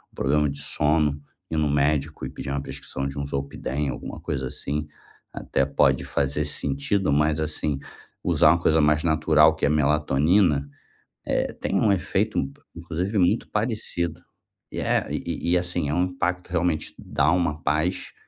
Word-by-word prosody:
problema 75 +1 +2
de 70 0 -6
sono, 75 -1 +1 0.3
ir 80 - -1
no 75 -1 +2
médico 75 +1 0
e - - -4
pedir - - -7
uma 70 - -1
prescrição 70 0 -5
de 70 +1 -7
um 70 - -2
Zolpidem, 70 +1 -3
alguma - - -6
coisa, 65 -1 -3
assim, 75 +4 -3 0.5
até - - 0
pode - - +2
fazer 70 -1 -1
sentido. 75 +7 -1
Mas, 75 +1 +2
assim, 75 -2 -1 0.4
usar 75 - +4
uma 85 - +2
coisa 80 -1 +3
mais 75 0 +3
natural, 80 -1 +4
que - - -13
é - - +4
a - - +2
melatonina, 75 +1 +2 0.6
eh, - - 0
tem - - -2
um 105 - +3
efeito 90 -5 0 0.4
inclusive 85 +5 -3
muito 90 +5 +2
parecido, 105 -7 -2 0.5
e - - -5
é - - +1
e 85 - -2
e, 90 - +5
assim, 90 -3 -2
é 75 - 0
um 90 - +2
impacto, 90 0 -2
realmente 85 -2 -1
dá 70 +3 +1
uma 85 -3 0
paz, 80 +6 0
75 Hz, 165 wpm, -24 LUFS, 70-85 Hz, 0.6 s, e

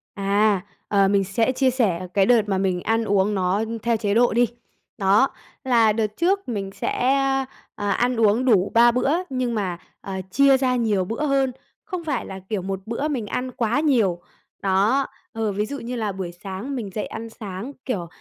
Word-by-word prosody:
À, 200 0 +2 0.3
ờ, 200 -1 +3
mình 200 0 +3
sẽ 225 +6 +1
chia 265 0 +2
sẻ 185 -8 0
cái 195 -1 +4
đợt 235 -1 +5
mà 190 - +1
mình 185 -2 0
ăn 225 0 +1
uống 205 0 +1
nó 190 +3 +1 0.2
theo 235 -1 +2
chế 205 -2 -1
độ 240 -1 +4
đi. 240 0 +3 0.5
Đó, 200 +7 +4 0.4
là 230 -4 +4
đợt 220 -1 +1
trước 380 -2 +1
mình 195 -4 -3
sẽ - - -3 0.8
à, 205 -1 -2
ăn 245 +3 +1
uống 225 +4 +3
đủ 205 -6 +3
3 235 +1 +6
bữa 250 +3 +1 0.2
nhưng 250 -3 -1
mà, 185 -5 -2 0.2
à, 190 -1 -5
chia 275 -1 +5
ra 255 -1 +1
nhiều 210 -6 +1
bữa 230 +9 -2
hơn, 275 -2 +2 0.3
không 365 -4 -5
phải 315 - -2
là, 190 - -7
kiểu, 210 -3 -1
một 190 +1 -3
bữa 235 +7 -2
mình 255 -8 -2
ăn 255 +4 -3
quá 240 +1 0
nhiều, 220 - +2 0.4
đó 200 +8 +2 0.3
ờ, 220 -2 -1
ví 205 +2 -1
dụ 280 +4 -6
như 245 +2 -5
là 215 -3 -1
buổi 185 -2 -5
sáng 200 +8 -5
mình 225 -6 -4
dậy 210 - -2
ăn 225 +1 -7
sáng, 210 +3 -7
kiểu, 190 -10 -2
220 Hz, 200 wpm, -23 LUFS, 195-250 Hz, 0.8 s, 3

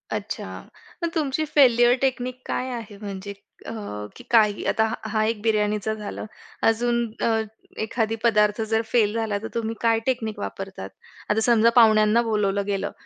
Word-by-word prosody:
अच्छा - - -5 0.6
मग 335 - +1
तुमची 310 -1 0
फेल्युर 245 -5 +5
टेक्निक 255 -1 -1
काय 255 - -2
आहे? 220 -4 -7
म्हणजे 200 -1 -6 0.3
अ, - - -6 0.4
की 245 - -12
काय, 220 -3 +6 0.2
आता 220 - +2 0.2
हा 215 0 +1
एक 220 -1 -1
बिर्याणीचा 210 -1 0
झालं. 210 0 -6 0.4
अजून 235 +1 +2 0.3
अ, - - +3 0.5
एखादा 220 0 -1
पदार्थ 210 -1 +3
जर 220 0 +1
फेल 215 -4 +3
झाला, 220 -3 -1
तर - - -3
तुम्ही 230 -1 -2
काय 230 -1 +3
टेक्निक 220 -5 -2
वापरतात? 195 - -6 0.4
आता 215 +1 +2
समजा 230 -1 +4
पाहुण्यांना 215 -1 +6
बोलावलं 200 -3 0
गेलं 200 -1 -2
220 Hz, 150 wpm, -24 LUFS, 210-235 Hz, 0.6 s, काय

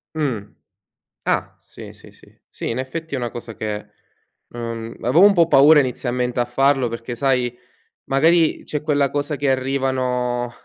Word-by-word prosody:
Mh. 135 -9 -1 0.8
Ah, - - -1
sì, - - -12
sì, - - -16
sì. - - -20 0.2
Sì, - - -6
in 115 - -2
effetti, 160 +4 -6
è - - -2
una 120 -2 -3
cosa 115 -2 -8
che 105 0 -5 0.6
non 115 -1 -6
avevo 135 +10 +4
un 205 - +6
po' 170 -3 +4
paura 150 +1 +7
inizialmente 125 -2 -1
a 120 - +2
farlo 135 +1 +2
perché, 115 +1 -6
sai, 125 -2 0 0.5
magari 160 +4 +3
c'è 150 - -4
quella 145 -2 +1
cosa 145 +1 -2
che 140 -1 0
arrivano 130 -2 -1
130 Hz, 160 wpm, -21 LUFS, 120-145 Hz, 0.8 s, paura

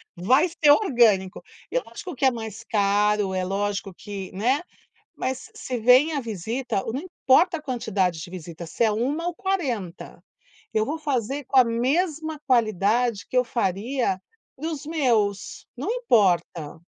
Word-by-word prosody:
vai 255 - +3
ser 315 -4 +4
orgânico. 235 - +3 0.3
E - - -1
lógico 365 - -9
que 255 - -7
é 265 - +6
mais 225 -1 -7
caro, 205 -1 +1
é 185 0 -1
lógico 200 +1 -2
que, 195 0 -7
né, 245 +9 +1 0.5
mas 260 0 -2
se - - -13
se 250 -1 -4
vem 250 +7 +5
a 285 - 0
visita, 225 0 -3
não 265 - -2
importa 345 0 +2
a - - -10
quantidade 205 - -1
de 155 - -8
visita, 170 -1 -8
se 165 +8 -1
é 220 - +4
1 280 +10 -1
ou 350 - -2
40, 255 - -3 0.5
eu 215 0 +2
vou 310 +3 -3
fazer 275 -2 -2
com 270 - 0
a 255 - +9
mesma 305 +7 0
qualidade 225 -2 +2
que 255 - -1
eu 250 - +4
faria 230 0 -1 0.4
para 310 +5 -4
os 305 -3 -6
meus, 235 -11 0
não - - -3
importa. 180 - +1
235 Hz, 160 wpm, -24 LUFS, 200-280 Hz, 0.5 s, a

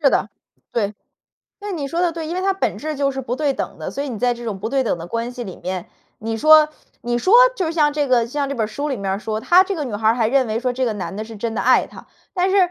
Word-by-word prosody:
是 280 -3 +5
的， - - +1 0.4
对， 210 -3 -1 0.7
那 410 0 -5
你 295 -6 -3
说 335 +5 -2
的 350 -2 +2
对， 325 -1 -5
因 330 - -4
为 365 - -1
它 390 +1 +2
本 385 - -2
质 310 0 -4
就 275 0 +1
是 270 0 -4
不 250 -1 -3
对 295 -2 +1
等 - - -5
的， - - -5
所 280 - -3
以 285 - -4
你 235 -5 -5
在 245 +1 +2
这 240 0 -9
种 215 -4 -3
不 210 +4 -3
对 270 +2 +1
等 220 - 0
的 165 - -7
关 230 +5 -3
系 245 -1 -6
里 190 -4 -8
面， 185 -1 -5 0.3
你 225 +1 -3
说 310 +3 +7 0.3
你 240 0 0
说 370 - +3 0.2
就 365 - 0
是 320 - -2
像 300 -3 +3
这 290 -1 0
个， 240 -2 +3
像 280 +3 -2
这 280 - -3
本 230 -4 0
儿 - - -2
书 285 +7 -4
里 270 - -1
面 200 -2 -3
儿 195 - -1
说， 215 0 -3
她 360 +9 +6
这 395 0 -3
个 305 - -3
女 245 -6 -5
孩 215 +1 +1
儿 225 - +4
还 235 -2 +1
认 265 +1 +3
为 220 0 -1
说 250 +1 -1
这 260 +1 -1
个 235 - 0
男 195 -1 -5
的 215 +2 -4
是 225 -1 -10
真 225 +2 -3
的 - - -1
爱 - - +4
她， - - -13 0.3
但 370 0 +1
是 390 - +2
255 Hz, 340 characters per minute, -21 LUFS, 225-305 Hz, 0.7 s, 说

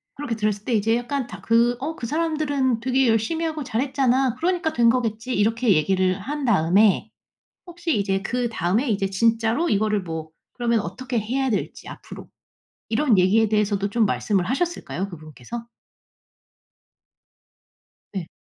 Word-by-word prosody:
그렇게 275 -5 -3
들었을 210 -1 -2
때 250 - -1
이제 225 +1 +2
약간 250 +2 -2
다 - - -10
그 235 +1 +3
어 310 +4 -4
"그 235 - -5
사람들은 290 -5 0
되게 260 +2 +2
열심히 230 +9 +1
하고 310 -2 -3
잘했잖아. 260 0 +1
그러니까 340 +2 0
된 235 -1 +4
거겠지." 230 0 -1
이렇게 225 +2 +2
얘기를 185 +4 +1
한 285 +9 -4
다음에 200 -1 +3 0.5
혹시 345 -4 -2
이제 195 -1 0
그다음에 235 - -1
이제 195 -2 0
진짜로 230 - +1
이거를 210 0 +1
뭐 160 -2 -6 0.2
그러면 235 -2 +1
어떻게 240 +7 -3
해야 260 +5 -1
될지 215 - -3
앞으로 - - -10 0.6
이런 230 -1 +2
얘기에 210 +4 +3
대해서도 205 -2 +1
좀 225 +2 +2
말씀을 195 -2 0
하셨을까요, 245 - -2
그분께서? 155 - -9 2.5
네. 185 -5 -4
230 Hz, 330 characters per minute, -23 LUFS, 200-260 Hz, 2.5 s, 된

